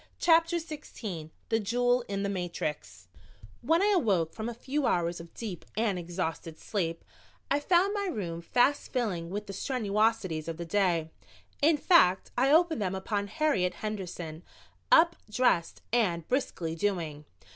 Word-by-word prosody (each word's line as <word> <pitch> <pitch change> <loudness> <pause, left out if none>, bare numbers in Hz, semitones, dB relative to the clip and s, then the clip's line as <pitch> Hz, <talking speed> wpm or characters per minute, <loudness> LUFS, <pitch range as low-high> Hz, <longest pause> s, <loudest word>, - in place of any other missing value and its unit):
CHAPTER 330 0 +4
XVI 255 - -6 0.2
THE 225 - +2
JEWEL 245 +4 +2
IN 200 0 -2
THE 200 - -1
MATRIX 175 -5 -4 0.5
When 330 +4 +3
I 415 0 +4
awoke 190 - +1
from 220 +1 -4
a - - -5
few 270 +3 -1
hours 170 0 0
of 170 0 -11
deep 205 -8 -6
and 215 -5 +1
exhausted 170 -2 -4
sleep 170 -5 -3 0.5
I 285 - +3
found 360 +6 +3
my 405 -1 -1
room 175 - -4
fast 250 +10 +1
filling 195 -10 -1
with 205 +3 -4
the 195 - -7
strenuosities 210 - 0
of 165 -1 -4
the 170 - -5
day. 170 -4 +1 0.5
In 305 +1 +5
fact, 285 - +4
I 265 +3 +3
opened 320 -4 +4
them 190 -1 -1
upon 200 +1 -2
Harriet 210 - +1
Henderson, 180 -6 -5 0.5
up, 340 -8 +6
dressed 210 -7 +1
and 175 -9 +1
briskly 185 - -1
doing. 165 -5 -2
205 Hz, 150 wpm, -29 LUFS, 170-265 Hz, 0.5 s, up